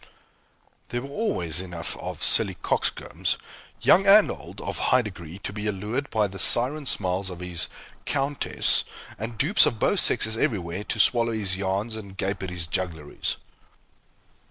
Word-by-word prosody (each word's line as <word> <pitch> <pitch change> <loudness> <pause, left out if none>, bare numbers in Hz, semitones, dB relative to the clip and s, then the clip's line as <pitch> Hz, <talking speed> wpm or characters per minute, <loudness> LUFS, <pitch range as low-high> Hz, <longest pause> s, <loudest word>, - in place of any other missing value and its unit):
There 120 +1 -4
were 135 - -8
always 90 - -2
enough 90 -3 -5
of - - -6
silly - - +5
coxcombs, - - -2 0.4
young 195 +3 +4
and 205 +1 +6
old, - - -10
of - - -5
high 130 -1 +4
degree, 90 -5 -9
to 100 - -6
be 105 0 -5
allured 105 +8 -3
by 110 -3 +1
the 95 -1 -7
siren 135 - +3
smiles 95 -2 0
of 90 -2 -9
his 90 -4 0 0.4
"Countess;" 140 0 +4 0.4
and 115 +1 -6
dupes 170 - +5
of 115 - -2
both - - +1
sexes 110 - +2
everywhere, 95 -4 -2
to 110 - -2
swallow 115 +1 +4
his 100 -4 0
yarns 100 +4 -3
and 100 -3 -10
gape 95 0 -3
at 95 - -4
his 90 -2 -3
juggleries. 80 -4 -2
105 Hz, 155 wpm, -25 LUFS, 90-120 Hz, 0.4 s, and